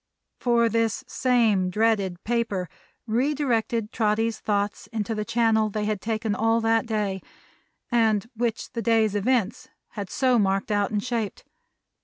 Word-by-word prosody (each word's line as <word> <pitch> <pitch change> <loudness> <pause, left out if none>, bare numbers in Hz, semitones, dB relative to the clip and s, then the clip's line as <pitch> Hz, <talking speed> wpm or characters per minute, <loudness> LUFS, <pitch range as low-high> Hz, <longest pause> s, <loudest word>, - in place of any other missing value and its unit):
For 235 -1 +3
this 230 0 0
same 225 -7 +2
dreaded 200 -3 0
paper 225 -6 -1 0.4
re 250 +6 +1
directed 230 -5 0
Trotty's 225 0 0
thoughts 205 -1 -2
into 225 -1 -3
the 215 -1 -2
channel 225 -1 +2
they 210 0 -2
had 210 -2 -2
taken 220 -1 -1
all 225 +2 +2
that 225 +1 +2
day, 205 -4 -1 0.7
and 225 -3 +2
which 235 0 -2
the 230 - -2
day's 225 -3 +2
events 220 0 0 0.2
had 200 -3 -6
so 255 -3 +2
marked 195 +1 0
out 205 -1 +1
and 210 -1 -2
shaped. 230 -5 -3
220 Hz, 145 wpm, -25 LUFS, 210-230 Hz, 0.7 s, For